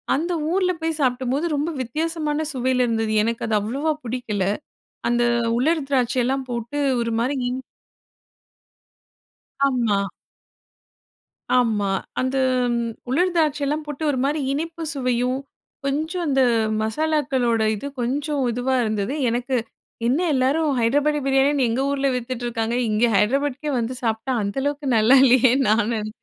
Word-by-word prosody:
அந்த 335 Hz, +6 st, -1 dB, 0.2 s
ஊர்ல 365 Hz, 0 st, +2 dB
போய் 320 Hz, -1 st, -2 dB
சாப்ட்டம்போது, 260 Hz, +4 st, 0 dB
ரொம்ப 295 Hz, +3 st, -1 dB
வித்தியாசமான 310 Hz, +3 st, -2 dB
சுவையில 255 Hz, 0 st, +1 dB
இருந்தது. 225 Hz, -1 st, 0 dB
எனக்கு 230 Hz, +1 st, -2 dB
அது 220 Hz, -, +1 dB
அவ்ளவா 275 Hz, +9 st, -1 dB
புடிக்கல. 230 Hz, -5 st, -2 dB, 0.7 s
அந்த 240 Hz, 0 st, +2 dB, 0.4 s
உலர் 305 Hz, +2 st, +1 dB
திராட்சை 255 Hz, -2 st, +1 dB
எல்லாம் 265 Hz, +1 st, -1 dB
போட்டு 240 Hz, +4 st, -4 dB, 0.2 s
ஒரு 230 Hz, 0 st, -1 dB
மாரி 260 Hz, +4 st, 0 dB
இனி 255 Hz, +1 st, -4 dB, 2.0 s
ஆமா. 240 Hz, -6 st, +1 dB, 1.6 s
ஆமா, 220 Hz, -5 st, +2 dB, 0.3 s
அந்த 260 Hz, +1 st, 0 dB, 0.3 s
ம் 235 Hz, -, 0 dB, 0.3 s
உலர் 355 Hz, +7 st, +2 dB
திராட்சைலாம் 300 Hz, -1 st, +1 dB
போட்டு, 295 Hz, +1 st, -6 dB
ஒரு 265 Hz, -, -2 dB
மாரி 295 Hz, +3 st, 0 dB
இனிப்பு 325 Hz, +3 st, -4 dB
சுவையும், 250 Hz, -1 st, 0 dB, 0.5 s
கொஞ்சம் 315 Hz, +6 st, -1 dB
அந்த 270 Hz, -1 st, +2 dB, 0.4 s
மசாலாக்களோட 255 Hz, -2 st, 0 dB
இது 275 Hz, -, -6 dB
கொஞ்சம் 280 Hz, +4 st, -1 dB
இதுவா 245 Hz, +3 st, 0 dB
இருந்தது. 215 Hz, +3 st, -1 dB, 0.2 s
எனக்கு, 245 Hz, +2 st, -1 dB, 0.5 s
என்ன 265 Hz, +7 st, +2 dB
எல்லாரும் 275 Hz, +5 st, +2 dB
ஹைட்ராபாடி 290 Hz, +6 st, +2 dB
பிரியாணின்னு, 270 Hz, -1 st, +3 dB
எங்க 260 Hz, +4 st, 0 dB
ஊர்ல 275 Hz, -1 st, +1 dB
வித்துட்டிருக்காங்க. 240 Hz, -2 st, -3 dB
இங்கே 220 Hz, +3 st, +2 dB
ஹைட்ராபாட்க்கே 280 Hz, +6 st, 0 dB
வந்து 235 Hz, +2 st, -3 dB
சாப்ட்டா, 225 Hz, +3 st, -1 dB
அந்த 200 Hz, +3 st, -4 dB
அளவுக்கு 285 Hz, 0 st, -2 dB
நல்லா 230 Hz, +5 st, +6 dB
இல்லையேன்னு 255 Hz, +1 st, +4 dB
நான் 220 Hz, +1 st, +2 dB
நென 215 Hz, -1 st, -3 dB
260 Hz, 130 wpm, -22 LUFS, 235-290 Hz, 2.0 s, நல்லா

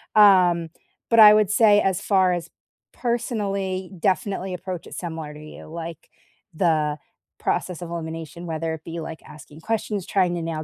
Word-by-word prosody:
Um, 180 Hz, -5 st, +5 dB, 0.4 s
but 230 Hz, -, +4 dB
I 210 Hz, -1 st, +10 dB
would 210 Hz, -2 st, +3 dB
say 210 Hz, -1 st, +5 dB
as 190 Hz, 0 st, 0 dB
far 190 Hz, -3 st, +3 dB
as 175 Hz, -1 st, -4 dB, 0.4 s
personally, 200 Hz, -6 st, -2 dB
definitely 190 Hz, 0 st, -1 dB
approach 180 Hz, -1 st, -6 dB
it -, -, -9 dB
similar 160 Hz, -3 st, -6 dB
to 150 Hz, -, -11 dB
you, 155 Hz, -, -11 dB
like, 165 Hz, 0 st, -8 dB, 0.4 s
the 155 Hz, -3 st, +1 dB, 0.4 s
process 180 Hz, -2 st, -2 dB
of 175 Hz, -, -6 dB
elimination, 165 Hz, 0 st, -6 dB
whether 165 Hz, -1 st, -3 dB
it 160 Hz, -1 st, -8 dB
be, 165 Hz, 0 st, -6 dB
like, 160 Hz, 0 st, -7 dB
asking 150 Hz, +1 st, -13 dB
questions, 210 Hz, -2 st, -2 dB
trying 180 Hz, -3 st, +1 dB
to 170 Hz, -, -3 dB
nail 165 Hz, -1 st, -4 dB
175 Hz, 165 wpm, -23 LUFS, 165-200 Hz, 0.4 s, I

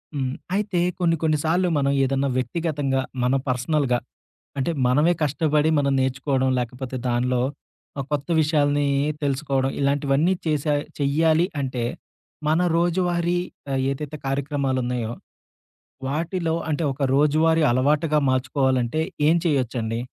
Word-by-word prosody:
హ్మ్. 130 Hz, -2 st, -1 dB, 0.2 s
అయితే 205 Hz, -3 st, 0 dB, 0.2 s
కొన్ని 165 Hz, -2 st, +2 dB
కొన్ని 155 Hz, -1 st, +2 dB
సార్లు 175 Hz, +3 st, +2 dB
మనం 140 Hz, -1 st, +2 dB
ఏదన్నా 135 Hz, +1 st, 0 dB
వ్యక్తిగతంగా 145 Hz, -1 st, -1 dB, 0.2 s
మన 125 Hz, +2 st, +2 dB
పర్సనల్‌గా 130 Hz, 0 st, +1 dB, 0.6 s
అంటే 135 Hz, +5 st, 0 dB
మనమే 150 Hz, +8 st, +4 dB
కష్టబడి, 150 Hz, +1 st, +1 dB
మనం 140 Hz, -1 st, +1 dB
నేర్చుకోవడం 130 Hz, 0 st, 0 dB
లేకపోతే 125 Hz, +2 st, -5 dB
దానిలో 125 Hz, +1 st, +1 dB, 0.6 s
ఆహ్, 135 Hz, -, -3 dB
కొత్త 145 Hz, +1 st, -1 dB
విషయాల్ని 145 Hz, -2 st, +2 dB, 0.4 s
తెలుసుకోవడం. 135 Hz, -1 st, 0 dB
ఇలాంటివన్నీ 140 Hz, +4 st, +2 dB
చేసా 150 Hz, -1 st, +1 dB, 0.3 s
చెయ్యాలి 160 Hz, +4 st, +3 dB, 0.2 s
అంటే 130 Hz, -3 st, -2 dB, 0.6 s
మన 155 Hz, +2 st, +3 dB, 0.2 s
రోజువారీ 175 Hz, 0 st, +1 dB, 0.3 s
ఆహ్, 135 Hz, -1 st, 0 dB
ఏదైతే 150 Hz, +2 st, -5 dB
కార్యక్రమాలున్నాయో 130 Hz, -4 st, -1 dB, 0.9 s
వాటిలో 165 Hz, +3 st, -1 dB
అంటే 155 Hz, +2 st, 0 dB
ఒక 140 Hz, +2 st, -4 dB
రోజువారీ 155 Hz, +3 st, +3 dB
అలవాటుగా 150 Hz, +5 st, +2 dB
మార్చుకోవాలంటే 130 Hz, +1 st, +1 dB, 0.3 s
ఏం 160 Hz, -, +5 dB
చేయొచ్చండి? 120 Hz, -6 st, 0 dB
140 Hz, 115 wpm, -23 LUFS, 130-160 Hz, 0.9 s, ఏం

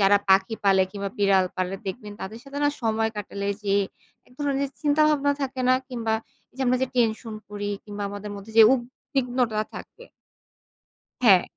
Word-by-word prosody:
যারা 200 Hz, +1 st, +6 dB
পাখি 190 Hz, +3 st, +4 dB
পালে 190 Hz, -1 st, +5 dB
কিংবা 200 Hz, 0 st, -4 dB
বিড়াল 195 Hz, -2 st, +4 dB
পালে, 185 Hz, 0 st, -1 dB
দেখবেন 210 Hz, +1 st, -5 dB
তাদের 215 Hz, +4 st, -6 dB
সাথে 280 Hz, +1 st, -6 dB
না -, -, +5 dB
সময় 225 Hz, 0 st, +1 dB
কাটালে 200 Hz, -1 st, -4 dB
যেয়ে 200 Hz, 0 st, +2 dB, 0.5 s
এক -, -, -22 dB
ধরনের 280 Hz, -1 st, 0 dB
চিন্তাভাবনা 295 Hz, -1 st, +3 dB
থাকে 265 Hz, -1 st, -3 dB
না 255 Hz, -, +6 dB
কিংবা 230 Hz, -3 st, -1 dB, 0.4 s
যে -, -, -8 dB
আমরা 250 Hz, +1 st, +4 dB
যে -, -, +2 dB
টেনশন 225 Hz, -1 st, +1 dB
করি 205 Hz, 0 st, -4 dB, 0.2 s
কিংবা 205 Hz, -1 st, -6 dB
আমাদের 205 Hz, +1 st, -6 dB
মধ্যে, 200 Hz, +3 st, -10 dB
যে -, -, +12 dB
উদ্বিগ্নতা 245 Hz, -2 st, -1 dB
থাকে -, -, -10 dB, 1.2 s
হ্যাঁ। 190 Hz, -6 st, +7 dB
220 Hz, 160 wpm, -25 LUFS, 200-255 Hz, 1.2 s, যে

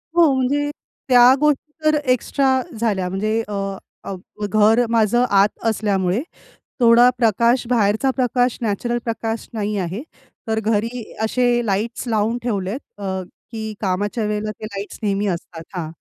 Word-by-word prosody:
हो, 335 Hz, -4 st, +6 dB
म्हणजे 280 Hz, +3 st, 0 dB, 0.4 s
त्या 250 Hz, 0 st, +8 dB
गोष्टी, 300 Hz, 0 st, +1 dB
तर 310 Hz, 0 st, +4 dB, 0.2 s
एक्स्ट्रा 260 Hz, +1 st, +1 dB, 0.2 s
झाल्या. 200 Hz, -5 st, 0 dB
म्हणजे 215 Hz, +4 st, 0 dB
अ, 210 Hz, -, -6 dB, 0.5 s
अ, 195 Hz, -, -5 dB, 0.3 s
घर 215 Hz, +4 st, +4 dB
माझं 230 Hz, +1 st, +3 dB
आत 200 Hz, +1 st, +5 dB, 0.2 s
असल्यामुळे 200 Hz, -2 st, 0 dB, 0.6 s
थोडा 235 Hz, +1 st, +7 dB
प्रकाश 235 Hz, +2 st, +2 dB
बाहेरचा 220 Hz, +2 st, +2 dB
प्रकाश, 250 Hz, -1 st, +1 dB
नॅचरल 235 Hz, +3 st, -1 dB
प्रकाश 225 Hz, -1 st, -3 dB
नाही 210 Hz, -1 st, -2 dB
आहे. 185 Hz, +5 st, -3 dB, 0.5 s
तर 220 Hz, 0 st, +1 dB
घरी 225 Hz, +3 st, -1 dB, 0.2 s
असे 240 Hz, +1 st, +1 dB
लाईट्स 215 Hz, +5 st, -2 dB
लावून 220 Hz, +1 st, +1 dB
ठेवले 200 Hz, -6 st, -2 dB
आहेत 225 Hz, -2 st, -9 dB
अ, 190 Hz, -1 st, -3 dB, 0.3 s
की 220 Hz, -2 st, -5 dB
कामाच्या 205 Hz, +3 st, -1 dB
वेळेला 210 Hz, 0 st, -2 dB
ते 215 Hz, -, -9 dB
लाईट्स 200 Hz, -1 st, -7 dB
नेहमी 205 Hz, -1 st, 0 dB
असतात 170 Hz, -3 st, -4 dB
हां. 175 Hz, -3 st, -3 dB
220 Hz, 140 wpm, -20 LUFS, 205-245 Hz, 0.6 s, त्या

